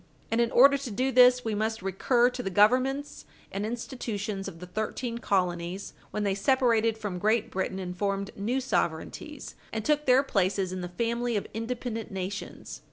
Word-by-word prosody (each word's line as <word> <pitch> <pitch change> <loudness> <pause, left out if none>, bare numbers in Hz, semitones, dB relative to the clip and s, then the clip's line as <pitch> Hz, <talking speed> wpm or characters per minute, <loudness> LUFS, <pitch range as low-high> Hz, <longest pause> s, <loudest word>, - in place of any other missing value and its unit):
And 230 +1 +3
in 235 - +2
order 280 +4 +6
to 270 -2 -5
do 255 +5 0
this, 250 -1 +6
we 220 - -1
must 220 0 -1
recur 240 +6 +2
to 250 0 -5
the 195 - -3
Governments 255 +8 +2 0.3
and 195 - -3
institutions 220 -4 -4
of 165 - -8
the 180 - -7
thirteen 220 +5 -3
colonies 180 -2 -1 0.2
when 210 - -3
they 200 -1 +1
separated 230 0 +2
from 200 -5 -4
Great 215 +3 +1
Britain 190 0 -2
and 180 -1 -5
formed 200 +1 -2
new 230 +7 -1
sovereignties, 260 - -3 0.2
and 220 -1 -4
took 300 -1 +1
their 255 +2 +6
places 190 -5 0
in 185 - -4
the 175 - -5
family 235 +4 -1
of 200 - -3
independent 230 0 -4
nations. 195 0 -6
220 Hz, 175 wpm, -28 LUFS, 195-250 Hz, 0.3 s, order